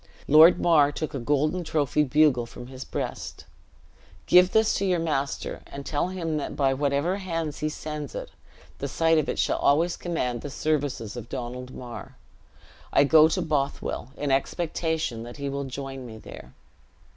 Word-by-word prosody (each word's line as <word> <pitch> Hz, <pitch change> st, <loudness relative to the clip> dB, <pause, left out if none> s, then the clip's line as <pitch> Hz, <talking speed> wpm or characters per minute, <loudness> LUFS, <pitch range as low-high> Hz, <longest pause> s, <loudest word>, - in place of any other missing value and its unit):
Lord 155 Hz, +4 st, +8 dB
Mar 150 Hz, -4 st, +4 dB
took 155 Hz, +1 st, -4 dB
a 135 Hz, -, -3 dB
golden 150 Hz, +7 st, 0 dB
trophied 150 Hz, -2 st, 0 dB
bugle 140 Hz, -5 st, +3 dB
from 120 Hz, -, -10 dB
his 130 Hz, +1 st, -8 dB
breast: -, -, -5 dB, 0.8 s
"Give 180 Hz, 0 st, +6 dB
this 220 Hz, 0 st, +3 dB
to 200 Hz, -, 0 dB
your 185 Hz, -2 st, +2 dB
master, 150 Hz, -4 st, -2 dB
and 140 Hz, 0 st, -8 dB
tell 150 Hz, +3 st, 0 dB
him 170 Hz, -4 st, -3 dB
that 145 Hz, -, -4 dB
by 135 Hz, -2 st, +2 dB
whatever 145 Hz, +6 st, 0 dB
hands 165 Hz, -6 st, -3 dB
he 155 Hz, -, -1 dB
sends 150 Hz, -2 st, -6 dB
it, -, -, -6 dB, 0.5 s
the 140 Hz, -, -3 dB
sight 165 Hz, +3 st, +3 dB
of 150 Hz, -, -2 dB
it -, -, -2 dB
shall -, -, +1 dB
always 165 Hz, +5 st, +3 dB
command 125 Hz, -9 st, -2 dB
the 145 Hz, -, -6 dB
services 145 Hz, -7 st, -2 dB
of 120 Hz, -2 st, -8 dB
Donald 125 Hz, 0 st, -6 dB
Mar. 120 Hz, -2 st, -9 dB, 0.7 s
I -, -, +5 dB
go 155 Hz, +2 st, +7 dB
to 180 Hz, +3 st, -1 dB
Bothwell, 140 Hz, -4 st, -2 dB
in 145 Hz, -1 st, -1 dB
expectation 160 Hz, -2 st, -1 dB
that 120 Hz, +3 st, -9 dB
he 140 Hz, -1 st, -3 dB
will 140 Hz, 0 st, -3 dB
join 135 Hz, -1 st, -6 dB
me 110 Hz, -1 st, -9 dB
there. -, -, -12 dB
145 Hz, 170 wpm, -26 LUFS, 135-160 Hz, 0.8 s, Lord